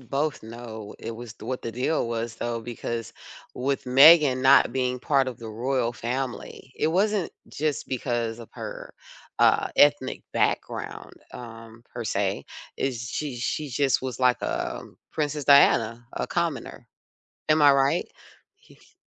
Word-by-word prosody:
both 140 +4 -2
know 110 -2 -9
it 115 - -6
was 115 -1 -9
the - - -13
what 130 +1 -3
the 115 - -5
deal 125 +2 0
was, 115 0 -3
though, 120 0 -3
because 115 0 -5 0.4
with 135 +2 -2
Meghan 140 +1 +7
not 135 -2 +6
being 125 -1 -1
part 135 0 +1
of 125 - -7
the 115 - -8
royal 120 +2 -1
family, 125 +1 -5
it - - +1
wasn't 195 +2 +1 0.2
just 150 -1 -2
because 120 -3 -2
of 115 - -10
her, - - -8 0.4
uh, - - +4
ethnic 145 -2 +3
background, - - -2 0.2
um, 115 -1 -11
per 120 -1 -5
se. 100 -2 -1 0.3
Is 120 -3 -3
she 145 -5 -4
she 145 +5 -3
just 135 +1 +1
was 130 -2 -4
like, 125 -1 +2
um, - - -4
Princess 150 -1 -2
Diana, 120 -5 +5
a - - -3
commoner. - - -3 0.6
Am 155 0 +4
I 145 -1 +8
right? 135 0 +2 0.5
He - - -21
th - - -25
125 Hz, 150 wpm, -25 LUFS, 115-140 Hz, 0.6 s, I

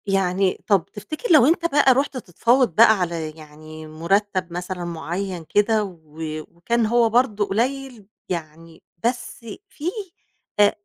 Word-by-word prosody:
يعني 190 -1 +1
طَب 200 -6 +3
تفتكر 310 - -5
لو 285 -6 +7
أنت 335 +3 +2
بقى 285 -4 +5
رُحت 275 +1 -1
تتفاوض 235 0 +1
بقى 220 -1 +6
على 165 -3 -2
يعني 155 +1 -12
مرتب 185 +3 -1
مثلًا 180 0 -4
معيّن 175 +2 -4
كده، 215 +1 +2
و 185 -4 -8 0.5
وكان 230 +7 0
هو 230 +1 +3
برضو 220 -3 +2
قليل 245 +1 -2 0.2
يعني 165 -1 -7 0.2
بس 245 -1 -3 0.2
فيه 320 +4 -4 0.7
أ 205 0 +6
200 Hz, 135 wpm, -22 LUFS, 170-240 Hz, 0.7 s, لو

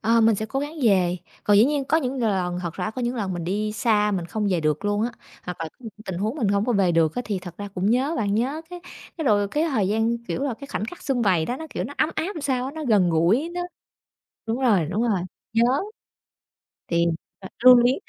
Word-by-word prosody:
Ờ, 230 +1 +3
mình 225 -1 +5
sẽ 220 +2 -3
cố 270 +5 -2
gắng 295 +3 -4
về. 185 -5 +3 0.3
Còn 205 - +5
dĩ 210 - +7
nhiên 285 0 0
có 310 - +2
những 265 -4 -1
l - - -2
lần, 185 -5 0
thật 170 -2 -4
ra, - - -3
có 250 +3 -5
những 240 +1 -1
lần 195 -5 -2
mình 175 -1 -4
đi 210 +4 -1
xa 210 -1 +2
mình 180 -4 -2
không 210 +3 -1
về 175 -3 +1
được 155 +4 0
luôn 205 +1 +1
á, 235 +1 -1 0.3
hoặc 180 -1 -6
là 165 - -3
có - - -34
những 230 -3 -8
tình 190 -5 -4
huống 215 +6 -1
mình 225 -8 0
hổng 200 +1 +2
có 245 - +1
về 195 -4 +3
được 160 -2 +2
á, 245 - -2
thì 205 -3 -2
thật 175 -2 -9
ra 205 - -5
cũng 190 +3 +1
nhớ 265 +7 +1
bạn. 205 -3 0
Nhớ, 265 +8 0
cái 355 - -7 0.4
cái, 320 - -3
rồi 205 -4 +3
cái 300 +8 0
thời 215 -10 +1
gian, 225 +3 +1
kiểu - - -2
là, 280 -4 -1
cái 280 - -7
khoảnh 215 - -3
khắc 360 - -8
sum 255 -4 0
vầy 180 -6 +3
đó 245 - -2
nó, 320 - -7
kiểu, - - -3
nó 285 - -7
ấm 310 - +2
áp - - -1
làm 320 - -5
sao 260 -3 0
á, 270 - -4
nó 315 -1 -5
gần 200 -7 +3
gũi 185 - +2
nó 355 - -2 0.9
đúng 230 +3 -1
rồi, 210 -11 +3
đúng 200 +5 -1
rồi, 215 -6 +1 0.3
nhớ. 225 +1 +4 1.2
Thì, 170 0 +2 0.3
ờ, 190 - -8 0.2
lưu 255 0 +10
luyến, 245 +2 +4
215 Hz, 270 wpm, -24 LUFS, 190-255 Hz, 1.2 s, lưu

